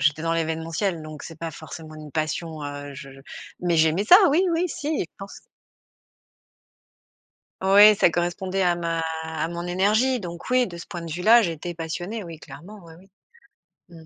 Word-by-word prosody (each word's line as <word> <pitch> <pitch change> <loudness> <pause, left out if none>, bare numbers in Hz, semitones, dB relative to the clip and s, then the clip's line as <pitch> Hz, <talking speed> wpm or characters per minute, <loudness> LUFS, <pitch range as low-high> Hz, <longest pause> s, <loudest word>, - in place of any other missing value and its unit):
j'étais 155 +1 +1
dans 165 - 0
l'événementiel, 165 +2 -2
donc 155 -1 -9
c'est 165 -2 -10
pas 165 0 -5
forcément 155 +1 -10
une 155 -1 -10
passion, 155 0 -3
heu 145 0 -7
je 135 0 -10 0.5
mais 175 -1 +1
j'aimais 160 +5 +3
ça, 350 - +9
oui 310 +6 +3
oui 335 +2 +1
si, 290 -1 -5
et 310 - 0
je 170 - -11
pense 195 0 -10 2.2
Oui, 205 +2 +7
ça 175 - +4
correspondait 175 +3 -2
à 175 -2 +2
ma 165 -1 -2 0.2
à 160 0 -3
mon 170 0 -5
énergie, 215 +8 +2
donc 170 +3 -8
oui, 255 -1 +3
de 175 - -9
ce 170 - -8
point 175 - -7
de 165 -1 -7
vue 175 +3 -4
là, 230 +3 +7
j'étais 175 -3 -3
passionnée. 175 +7 -5
Oui, 165 -3 -9
clairement, 205 +7 -12
oui, 165 - -13
oui. 190 - -20 0.8
Mmh. 165 -2 -14
170 Hz, 185 wpm, -24 LUFS, 160-195 Hz, 2.2 s, ça